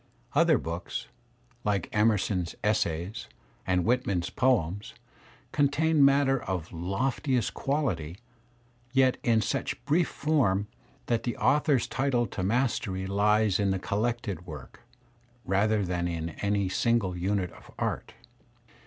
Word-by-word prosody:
Other -, -, +5 dB
books, 85 Hz, +3 st, -5 dB, 0.5 s
like 100 Hz, -3 st, 0 dB
Emerson's 105 Hz, -5 st, +1 dB
"Essays" 95 Hz, -2 st, -1 dB, 0.4 s
and 90 Hz, -1 st, +2 dB
Whitman's 100 Hz, -8 st, 0 dB
poems, 105 Hz, -7 st, 0 dB, 0.6 s
contain 145 Hz, +2 st, +3 dB
matter 140 Hz, -2 st, +4 dB
of 90 Hz, -3 st, -4 dB
loftiest 115 Hz, -, -1 dB
quality 105 Hz, -, -2 dB, 0.8 s
yet 130 Hz, -1 st, +4 dB
in 115 Hz, -2 st, +3 dB
such 135 Hz, +4 st, -3 dB
brief 160 Hz, +4 st, +3 dB
form 125 Hz, -11 st, +1 dB, 0.4 s
that 115 Hz, -1 st, 0 dB
the 120 Hz, -, -3 dB
author's 145 Hz, -3 st, +3 dB
title 130 Hz, -3 st, 0 dB
to 100 Hz, -, -5 dB
mastery 100 Hz, -3 st, 0 dB
lies 105 Hz, +1 st, +2 dB
in 100 Hz, -1 st, +2 dB
the 95 Hz, -, +1 dB
collected 105 Hz, -2 st, -2 dB
work, 75 Hz, -5 st, -9 dB, 0.7 s
rather 100 Hz, +2 st, +2 dB
than 90 Hz, -1 st, -1 dB
in 85 Hz, -1 st, -3 dB
any 100 Hz, -1 st, +1 dB
single 100 Hz, -1 st, +1 dB
unit 95 Hz, 0 st, -1 dB
of -, -, -16 dB
art. -, -, -3 dB
105 Hz, 120 wpm, -28 LUFS, 95-130 Hz, 0.8 s, Other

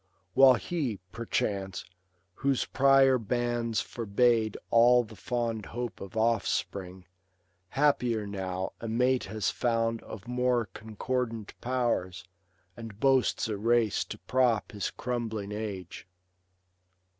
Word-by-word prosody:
While 130 Hz, -1 st, +7 dB
he, 135 Hz, -, -2 dB
perchance, 100 Hz, -4 st, -2 dB, 0.5 s
whose 135 Hz, +5 st, 0 dB
prior 135 Hz, -1 st, +4 dB
banns 120 Hz, 0 st, -1 dB
forbade 115 Hz, -1 st, +1 dB
All 120 Hz, +1 st, +6 dB
the 110 Hz, -1 st, -12 dB
fond 115 Hz, -2 st, -2 dB
hope 120 Hz, -1 st, -5 dB
of 100 Hz, +3 st, -8 dB
offspring, 100 Hz, -4 st, -1 dB, 0.6 s
happier 125 Hz, -6 st, +1 dB
now 95 Hz, -2 st, -3 dB
A 115 Hz, -, -4 dB
mate 125 Hz, +3 st, +1 dB
has 110 Hz, +1 st, -1 dB
found 115 Hz, -1 st, 0 dB
of 100 Hz, -1 st, -10 dB
more 125 Hz, -1 st, +1 dB
concordant 115 Hz, 0 st, -3 dB
powers, 120 Hz, -8 st, -1 dB, 0.5 s
And 110 Hz, -3 st, -9 dB
boasts 130 Hz, -2 st, +2 dB
a 105 Hz, -2 st, -2 dB
race 115 Hz, 0 st, +2 dB
to -, -, -7 dB
prop 125 Hz, -4 st, +1 dB
hi» 105 Hz, -, -10 dB, 0.2 s
crumbling 110 Hz, -4 st, -3 dB
age. 100 Hz, -5 st, -6 dB
115 Hz, 110 wpm, -29 LUFS, 105-125 Hz, 0.6 s, While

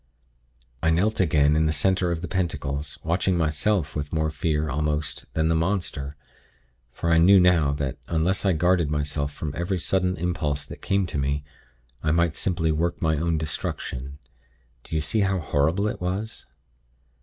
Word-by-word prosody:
"I 80 Hz, -, +2 dB
knelt 95 Hz, +7 st, +2 dB
again 75 Hz, -5 st, +3 dB
in 80 Hz, 0 st, +3 dB
the -, -, +2 dB
center 90 Hz, +4 st, +1 dB
of 85 Hz, 0 st, -2 dB
the -, -, -2 dB
pentacles, 75 Hz, -5 st, -2 dB
watching 90 Hz, +2 st, +1 dB
myself 80 Hz, +2 st, 0 dB
with 75 Hz, -1 st, -3 dB
more 80 Hz, -1 st, 0 dB
fear, 80 Hz, -1 st, -1 dB
almost, 75 Hz, +1 st, -2 dB
than 80 Hz, 0 st, +2 dB
the 80 Hz, -, +2 dB
monster; 80 Hz, -5 st, -1 dB, 0.7 s
for 85 Hz, +7 st, -2 dB
I 80 Hz, -, +5 dB
knew 95 Hz, +4 st, +7 dB
now 85 Hz, -5 st, +4 dB
that, 70 Hz, -3 st, -3 dB
unless 85 Hz, +4 st, 0 dB
I 95 Hz, -2 st, +3 dB
guarded 85 Hz, -1 st, +2 dB
myself 75 Hz, -1 st, -1 dB
from 75 Hz, 0 st, -5 dB
every 85 Hz, +3 st, -1 dB
sudden 90 Hz, +1 st, 0 dB
impulse 80 Hz, -4 st, -1 dB
that -, -, -10 dB
came 100 Hz, 0 st, +1 dB
to 80 Hz, -4 st, -3 dB
me, 70 Hz, +1 st, -1 dB, 0.6 s
I 75 Hz, -, 0 dB
might 85 Hz, -1 st, +2 dB
simply 85 Hz, -4 st, 0 dB
work 85 Hz, +2 st, -1 dB
my 80 Hz, -2 st, +1 dB
own 85 Hz, +1 st, 0 dB
destruction. 70 Hz, -3 st, -4 dB, 0.7 s
Do -, -, -6 dB
you 80 Hz, -, +1 dB
see 75 Hz, +9 st, 0 dB
how 95 Hz, -1 st, +2 dB
horrible 80 Hz, +5 st, +1 dB
it 105 Hz, -, -4 dB
all 90 Hz, -, 0 dB
was? 110 Hz, +3 st, -7 dB
80 Hz, 175 wpm, -25 LUFS, 75-90 Hz, 0.7 s, knew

